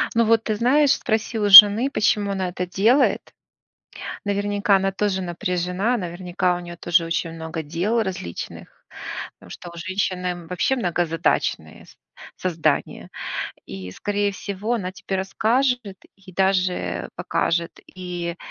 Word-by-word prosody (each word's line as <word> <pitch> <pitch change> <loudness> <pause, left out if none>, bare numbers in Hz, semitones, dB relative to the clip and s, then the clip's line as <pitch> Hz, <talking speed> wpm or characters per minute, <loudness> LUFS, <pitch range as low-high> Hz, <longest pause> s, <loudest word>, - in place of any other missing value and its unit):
Ну 230 - +3
вот, 225 0 +3
ты 215 - -1
знаешь, 270 +6 +3
спроси 220 0 -1
у 205 -1 +1
жены, 205 +6 +10
почему 210 -5 +1
она 190 -2 -2
это 180 +1 -4
делает? 220 +10 +3 1.0
Наверняка 205 0 +1
она 195 0 +1
тоже 195 -1 -1
напряжена, 180 +5 -1
наверняка 180 -1 -2
у - - -5
неё 175 0 -9
тоже 170 -1 +1
очень 165 0 -2
много 160 0 -6
дел 180 +10 -1
различных, 180 - -7 0.5
потому - - -18
что 175 - -9
у 170 - -13
женщины 180 -1 -3
вообще 180 +9 0
многозадачные 175 -6 -1
с - - -19 0.4
создания, 160 -5 -1 0.6
и, 95 -1 -8
скорее 205 - -1
всего, 200 +4 -4
она 185 -5 -3
тебе 190 +1 -5
расскажет, 225 +2 0 0.2
и 195 -1 -16
даже 185 0 0
покажет, 170 0 -2 0.2
и 175 -1 -5
190 Hz, 135 wpm, -22 LUFS, 175-210 Hz, 1.0 s, жены